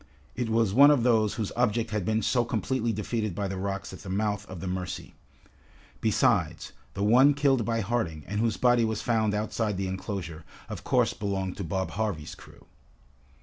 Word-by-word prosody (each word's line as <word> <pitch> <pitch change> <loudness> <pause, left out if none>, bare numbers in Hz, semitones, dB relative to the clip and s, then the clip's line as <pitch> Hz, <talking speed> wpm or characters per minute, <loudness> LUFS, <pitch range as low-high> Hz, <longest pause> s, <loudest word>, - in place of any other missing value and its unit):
It 120 -2 -2
was 110 -3 +2
one 140 +5 +8
of 145 -5 +4
those 110 -4 +3
whose 110 -4 -3
object 115 -2 +1
had 105 -4 -1
been 110 +1 0
so 120 +3 +2
completely 120 +1 -1
defeated 110 -2 -2
by 100 +1 -2
the 95 - -4
rocks 95 +1 -4
at - - -9
the 100 - -9
mouth 105 +1 -1
of 95 -2 -7
the 85 - -6
Mercy. 90 0 -4 0.9
Besides, - - +1 0.2
the 100 - -2
one 130 +7 +6
killed 135 -5 +2
by 115 -1 0
Harding, 100 -9 -2
and 105 +2 -3
whose 115 0 +1
body 120 -1 +4
was 110 -1 -1
found 110 -3 +1
outside 105 -1 -1
the 95 - -2
enclosure, 95 -4 -5 0.3
of - - -6
course - - +2
belonged 95 -2 -3
to 100 - -4
Bob 95 +3 -2
Harvey's 100 -8 -3
crew. - - -16
105 Hz, 190 wpm, -27 LUFS, 95-115 Hz, 0.9 s, one